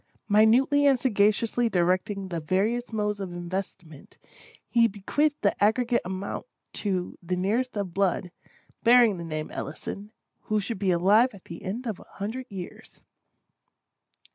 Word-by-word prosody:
Minutely 245 Hz, +7 st, +4 dB
and 270 Hz, -3 st, +4 dB
sagaciously 230 Hz, 0 st, +2 dB
directing 185 Hz, +1 st, 0 dB
the 170 Hz, -2 st, -3 dB
various 205 Hz, +10 st, 0 dB
modes 210 Hz, -2 st, -1 dB
of 190 Hz, -2 st, -5 dB
investment, 175 Hz, -3 st, -7 dB, 0.5 s
he 235 Hz, -1 st, +4 dB
bequeathed 285 Hz, +9 st, 0 dB
the 200 Hz, -, +3 dB
aggregate 235 Hz, +3 st, +2 dB
amount 190 Hz, -, -5 dB, 0.3 s
to 185 Hz, -3 st, -3 dB
the 180 Hz, +1 st, -2 dB
nearest 220 Hz, +7 st, -1 dB
of 195 Hz, -4 st, -3 dB
blood, 185 Hz, -2 st, 0 dB, 0.5 s
bearing 235 Hz, -5 st, +5 dB
the -, -, -5 dB
name 155 Hz, -2 st, -5 dB
Ellison, 200 Hz, +7 st, -6 dB, 0.3 s
who 215 Hz, -1 st, +1 dB
should 205 Hz, 0 st, -4 dB
be 195 Hz, -2 st, 0 dB
alive 200 Hz, +8 st, +4 dB
at 190 Hz, -, -16 dB
the 170 Hz, -, -9 dB
end 220 Hz, +7 st, -5 dB
of 220 Hz, -5 st, -3 dB
the -, -, -15 dB
hundred 225 Hz, +6 st, -5 dB
years. 190 Hz, -4 st, -10 dB
200 Hz, 140 wpm, -26 LUFS, 185-230 Hz, 0.5 s, bearing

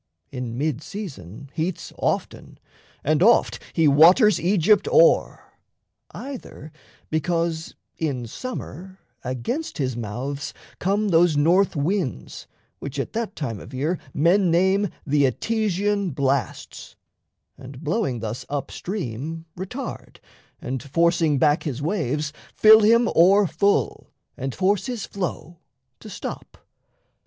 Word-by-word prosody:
In 125 Hz, -3 st, -5 dB
mid 145 Hz, -1 st, -1 dB
season 140 Hz, -, -8 dB
heats 165 Hz, +2 st, -3 dB
Often -, -, -3 dB, 0.5 s
and 155 Hz, +2 st, +1 dB
oft 230 Hz, +5 st, +4 dB
he 165 Hz, -2 st, +3 dB
waters 175 Hz, -, +6 dB
Aegypt 195 Hz, +3 st, +3 dB
o'er, -, -, +4 dB, 0.7 s
Either 250 Hz, -, -9 dB, 0.4 s
because 165 Hz, +1 st, -1 dB, 0.2 s
in 140 Hz, -7 st, -2 dB
summer 190 Hz, -, -7 dB, 0.3 s
against 130 Hz, -, -4 dB
his 130 Hz, -4 st, -1 dB
mouths 125 Hz, +6 st, -5 dB, 0.2 s
Come 200 Hz, +3 st, 0 dB
those 170 Hz, -2 st, +4 dB
northwinds 170 Hz, -, 0 dB, 0.3 s
which 140 Hz, 0 st, -7 dB
at 135 Hz, -, -3 dB
that 225 Hz, -3 st, -3 dB
time 115 Hz, -9 st, -4 dB
of 130 Hz, -, -10 dB
year 155 Hz, +7 st, -1 dB
Men 175 Hz, +7 st, +3 dB
name 190 Hz, +4 st, +2 dB, 0.2 s
the 145 Hz, -1 st, +3 dB
Etesian 200 Hz, -, -1 dB
blasts, 140 Hz, -1 st, -2 dB, 0.6 s
and, 135 Hz, +2 st, -11 dB
blowing 155 Hz, -, -1 dB
thus 110 Hz, +1 st, -4 dB
Upstream, 155 Hz, -, -5 dB
retard, 195 Hz, +10 st, -7 dB, 0.4 s
and, 130 Hz, 0 st, -4 dB
forcing 165 Hz, +1 st, +2 dB
back 145 Hz, +3 st, +3 dB
his 140 Hz, -5 st, -4 dB
waves, 150 Hz, -, -2 dB, 0.2 s
Fill 220 Hz, 0 st, +8 dB
him 230 Hz, +2 st, +4 dB
o'erfull 195 Hz, +2 st, +3 dB, 0.3 s
and 135 Hz, 0 st, -5 dB
force 195 Hz, +5 st, +1 dB
his 245 Hz, -4 st, -4 dB
flow 170 Hz, -3 st, -5 dB, 0.4 s
to -, -, -11 dB
stop. -, -, -7 dB
165 Hz, 110 wpm, -23 LUFS, 140-200 Hz, 0.7 s, Fill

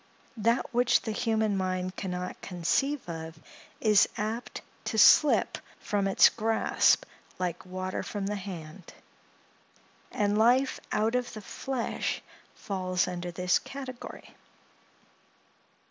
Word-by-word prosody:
That 230 Hz, +4 st, +1 dB
which 245 Hz, 0 st, +3 dB
the 220 Hz, -, -3 dB
human 220 Hz, -1 st, 0 dB
mind 185 Hz, -1 st, -2 dB
can 195 Hz, -, -4 dB
not 180 Hz, 0 st, -5 dB
conceive 220 Hz, -, -1 dB
of, 160 Hz, -1 st, -6 dB, 0.4 s
is 210 Hz, -2 st, +4 dB
apt 220 Hz, +3 st, -4 dB, 0.2 s
to 220 Hz, -, -2 dB
slip 295 Hz, +6 st, +6 dB, 0.2 s
from 200 Hz, -1 st, -1 dB
its 195 Hz, -, +7 dB
grasp 225 Hz, 0 st, +2 dB, 0.3 s
like 180 Hz, 0 st, -3 dB
water 185 Hz, 0 st, -3 dB
from 205 Hz, -2 st, -4 dB
the 205 Hz, +1 st, -2 dB
hand; 180 Hz, -3 st, -8 dB, 1.2 s
and 210 Hz, -3 st, +1 dB
life 255 Hz, +4 st, +3 dB
out 220 Hz, +2 st, +1 dB
of 250 Hz, -1 st, -1 dB
the 215 Hz, -, -7 dB
flesh 260 Hz, +4 st, -3 dB, 0.3 s
falls 185 Hz, -2 st, -1 dB
under 175 Hz, -1 st, -4 dB
this 180 Hz, +1 st, +1 dB
category. 265 Hz, -3 st, -9 dB
205 Hz, 115 wpm, -29 LUFS, 185-230 Hz, 1.2 s, its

